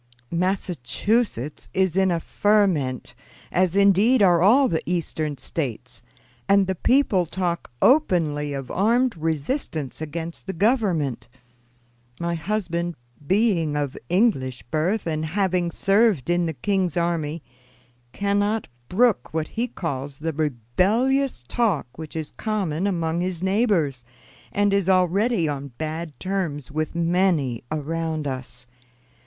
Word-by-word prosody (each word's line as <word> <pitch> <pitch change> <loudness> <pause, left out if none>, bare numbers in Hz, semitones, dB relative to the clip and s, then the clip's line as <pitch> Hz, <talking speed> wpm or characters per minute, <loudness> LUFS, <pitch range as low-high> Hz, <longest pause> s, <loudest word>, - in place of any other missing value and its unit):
"Massachusetts 180 - -1
is 190 -2 +2
in 190 0 +3
a 170 -2 +1
ferment, 180 -11 +1 0.4
as 185 0 +2
indeed 200 +4 +5
are 175 -3 +5
all 250 +9 +6
the 165 -6 0
Eastern 155 -4 -2
States, 130 -3 -5 0.5
and 200 0 +5
the 190 - -1
people 195 -3 +2
talk 175 0 -2
openly 165 - +3
of 135 -2 -5
armed 235 +5 +2
resistance 160 - -3
against 165 +4 -6
the 190 - -3
Government. 175 - +1 0.9
My 170 0 -1
husband, 170 -2 -2 0.3
being 185 -7 +2
of 145 -3 -2
English 135 - +1
birth 180 +8 0
and 155 -2 -1
having 180 +1 0
served 195 - +2
in 175 -1 +2
the 160 - -2
king's 185 0 -1
army, 165 -2 -1 0.7
cannot 205 - 0 0.2
brook 235 +3 +2
what 160 -1 -1
he 235 +2 -2
calls 140 - -5
the 160 +2 -3
rebellious 180 - +1
talk 195 - 0
which 160 -1 -8
is 155 -2 -4
common 195 -5 -2
among 170 -3 -1
his 180 -1 -3
neighbors, 190 - +1 0.5
and 205 0 +2
is 200 -2 +1
already 190 +1 +2
on 140 -1 -3
bad 160 0 -5
terms 175 -9 -3
with 155 +2 -2
many 170 -8 +1
around 155 0 -2
us. 130 -2 -5
170 Hz, 125 wpm, -24 LUFS, 155-200 Hz, 0.9 s, all